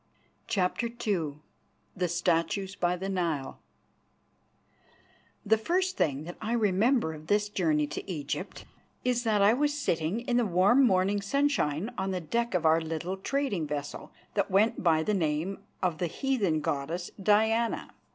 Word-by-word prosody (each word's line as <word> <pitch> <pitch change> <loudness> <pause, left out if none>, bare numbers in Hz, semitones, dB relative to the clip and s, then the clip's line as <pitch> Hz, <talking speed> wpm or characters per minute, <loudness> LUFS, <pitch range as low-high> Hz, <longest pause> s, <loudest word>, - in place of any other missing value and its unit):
CHAPTER 195 +4 0
II 200 -10 -2 0.6
THE 180 -1 0
STATUES 175 +3 0
BY 180 -2 +1
THE 190 +2 -4
NILE 170 -8 -2 1.9
The 220 +1 +3
first 365 +9 0
thing 145 -1 0
that 175 +2 -8
I 220 +2 -2
remember 220 -2 +2
of 155 0 -11
this 205 +1 +2
journey 160 -7 +1
to 150 +6 -6
Egypt 145 -5 -5 0.4
is 245 -1 +1
that 210 -3 +3
I 205 +2 +6
was 290 +3 +1
sitting 170 - -1
in 245 0 0
the 245 - +3
warm 195 +9 +4
morning 195 +1 +2
sunshine 215 - 0
on 190 0 -1
the 185 -1 -1
deck 230 +6 -1
of 170 -2 0
our 160 +1 +5
little 165 +4 -3
trading 205 - -1
vessel, 145 -1 -5 0.2
that 200 -2 0
went 205 +4 +2
by 160 -3 +3
the 210 - 0
name 165 +1 -1 0.2
of 175 -4 0
the 175 - 0
heathen 200 - 0
goddess, 155 +5 -3
Diana. 220 +3 +2
190 Hz, 150 wpm, -29 LUFS, 165-220 Hz, 1.9 s, I